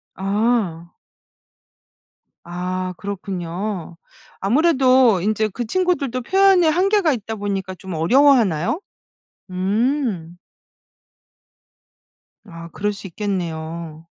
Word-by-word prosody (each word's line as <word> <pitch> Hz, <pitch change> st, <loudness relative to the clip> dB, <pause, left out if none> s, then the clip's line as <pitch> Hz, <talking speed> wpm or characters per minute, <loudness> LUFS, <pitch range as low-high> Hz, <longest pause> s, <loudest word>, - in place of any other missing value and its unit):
아. 195 Hz, -4 st, -1 dB, 1.5 s
아 180 Hz, +1 st, -4 dB
그렇군요. 190 Hz, -2 st, -5 dB, 0.5 s
아무래도 255 Hz, -, +4 dB
인제 215 Hz, +2 st, +1 dB
그 240 Hz, -, -3 dB
친구들도 280 Hz, -4 st, 0 dB
표현에 380 Hz, +3 st, +4 dB
한계가 365 Hz, +1 st, +3 dB
있다 220 Hz, -2 st, -5 dB
보니까 195 Hz, -2 st, -3 dB
좀 185 Hz, +1 st, -8 dB
어려워하나요? 225 Hz, -, +3 dB, 0.7 s
음. 195 Hz, -, -1 dB, 2.1 s
아 170 Hz, -3 st, -10 dB
그럴 210 Hz, +1 st, -1 dB
수 200 Hz, -1 st, -9 dB
있겠네요. 165 Hz, -4 st, -5 dB
200 Hz, 185 characters per minute, -21 LUFS, 175-255 Hz, 2.1 s, 아무래도